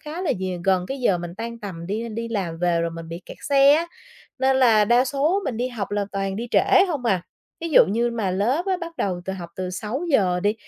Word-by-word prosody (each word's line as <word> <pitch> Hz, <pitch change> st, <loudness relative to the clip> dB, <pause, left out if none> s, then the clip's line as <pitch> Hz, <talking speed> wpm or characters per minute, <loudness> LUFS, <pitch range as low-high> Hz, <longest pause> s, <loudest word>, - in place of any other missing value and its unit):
khá 315 Hz, +4 st, -6 dB
là 355 Hz, -, +1 dB
nh 185 Hz, -2 st, -4 dB
gần 185 Hz, -2 st, +2 dB
cái 270 Hz, 0 st, -4 dB
giờ 195 Hz, -7 st, +2 dB
mình 170 Hz, 0 st, -7 dB
tan 230 Hz, +3 st, -6 dB
tầm 185 Hz, -6 st, -7 dB
đi 220 Hz, +5 st, -3 dB
đi 230 Hz, +1 st, -5 dB
làm 185 Hz, -7 st, -3 dB
về 175 Hz, -1 st, +1 dB
rồi 170 Hz, 0 st, -1 dB
mình 165 Hz, 0 st, -8 dB
bị 170 Hz, +2 st, -7 dB
kẹt -, -, -10 dB
xe 280 Hz, 0 st, +6 dB
á. 325 Hz, +3 st, +2 dB, 0.5 s
Nên 265 Hz, 0 st, +3 dB
là 230 Hz, -5 st, +5 dB
đa 240 Hz, +4 st, +4 dB
số 285 Hz, +8 st, +1 dB
mình 245 Hz, -, -2 dB
đi 245 Hz, +2 st, -1 dB
học 225 Hz, -6 st, -5 dB
là 205 Hz, 0 st, 0 dB
toàn 195 Hz, -1 st, -2 dB
đi 235 Hz, +3 st, -4 dB
trễ 375 Hz, -, +5 dB
hông 290 Hz, -7 st, -3 dB
à, 190 Hz, -7 st, +1 dB, 0.4 s
ví 335 Hz, -, -3 dB
dụ -, -, +7 dB
như 235 Hz, +4 st, 0 dB
mà 220 Hz, -5 st, -1 dB
lớp 240 Hz, -, 0 dB
á, 380 Hz, -1 st, +1 dB
bắt 340 Hz, -2 st, -8 dB
đầu 185 Hz, -, -1 dB
từ 190 Hz, -, -3 dB
học 175 Hz, -3 st, -7 dB
từ 185 Hz, -1 st, -3 dB
6:00 210 Hz, -, 0 dB
đi 205 Hz, +3 st, +1 dB
215 Hz, 255 wpm, -23 LUFS, 185-265 Hz, 0.5 s, dụ